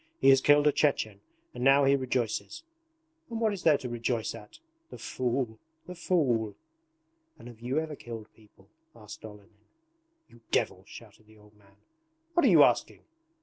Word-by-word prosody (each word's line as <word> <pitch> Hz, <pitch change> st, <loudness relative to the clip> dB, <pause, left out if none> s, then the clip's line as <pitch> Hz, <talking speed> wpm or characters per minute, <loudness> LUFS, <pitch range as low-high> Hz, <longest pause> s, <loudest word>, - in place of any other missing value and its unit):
He 135 Hz, -, +5 dB
has 135 Hz, 0 st, +6 dB
killed 145 Hz, +1 st, +4 dB
a 150 Hz, -, +5 dB
Chechen 135 Hz, -8 st, 0 dB, 0.3 s
and 125 Hz, -, -6 dB
now 135 Hz, +1 st, +5 dB
he 140 Hz, 0 st, +4 dB
rejoices. 130 Hz, -, -3 dB, 0.7 s
And 230 Hz, -1 st, -4 dB
what 220 Hz, -2 st, +1 dB
is 195 Hz, -, -6 dB
there 155 Hz, -5 st, +4 dB
to 135 Hz, -3 st, -7 dB
rejoice 120 Hz, -1 st, -2 dB
at?... 105 Hz, -, -12 dB, 0.3 s
The -, -, -10 dB
fool, 120 Hz, -3 st, -3 dB, 0.3 s
the 180 Hz, -, -8 dB
fool!' 130 Hz, -, 0 dB, 0.8 s
'And -, -, -13 dB
have 120 Hz, -2 st, -12 dB
you 125 Hz, +4 st, -3 dB
ever 160 Hz, -1 st, -5 dB
killed 115 Hz, -4 st, -9 dB
people?' 105 Hz, -3 st, -23 dB, 0.3 s
asked 105 Hz, -2 st, -12 dB
Olenin. 105 Hz, -1 st, -13 dB, 0.7 s
'You 120 Hz, -, -20 dB
devil!' -, -, -1 dB
shouted 110 Hz, -, -14 dB
the 110 Hz, 0 st, -20 dB
old 105 Hz, 0 st, -21 dB
man. 100 Hz, -1 st, -25 dB, 0.6 s
'What 345 Hz, 0 st, +3 dB
are -, -, +6 dB
you -, -, +7 dB
asking? -, -, +1 dB
120 Hz, 170 wpm, -28 LUFS, 110-145 Hz, 0.8 s, you